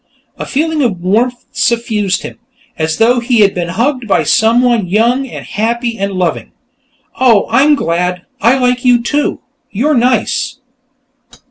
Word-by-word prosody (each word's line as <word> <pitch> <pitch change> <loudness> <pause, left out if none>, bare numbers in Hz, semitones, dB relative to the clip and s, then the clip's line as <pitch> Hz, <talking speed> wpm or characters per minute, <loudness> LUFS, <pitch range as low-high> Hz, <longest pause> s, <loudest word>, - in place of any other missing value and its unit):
A - - -5
feeling 310 +2 -1
of 220 -9 0
warmth 230 +7 -1
suffused 220 -5 -1
him, - - -9 0.4
as 160 0 -2
though 240 +2 +3
he 235 -1 +1
had 200 -1 +4
been 175 -1 -3
hugged 240 +7 -1
by 200 - +2
someone 235 -2 +2
young 235 +8 +1
and - - -9
happy 235 +2 -2
and 200 0 -2
loving. 180 -2 -2 0.7
"Oh, 235 -6 +4
I'm 295 +2 +4
glad. 180 - -2 0.2
I 235 +5 +4
like 250 -1 0
you, 245 -2 +3
too; 290 +4 -1 0.3
you're 275 +10 0
nice!" 250 -1 0
235 Hz, 145 wpm, -13 LUFS, 200-250 Hz, 0.7 s, had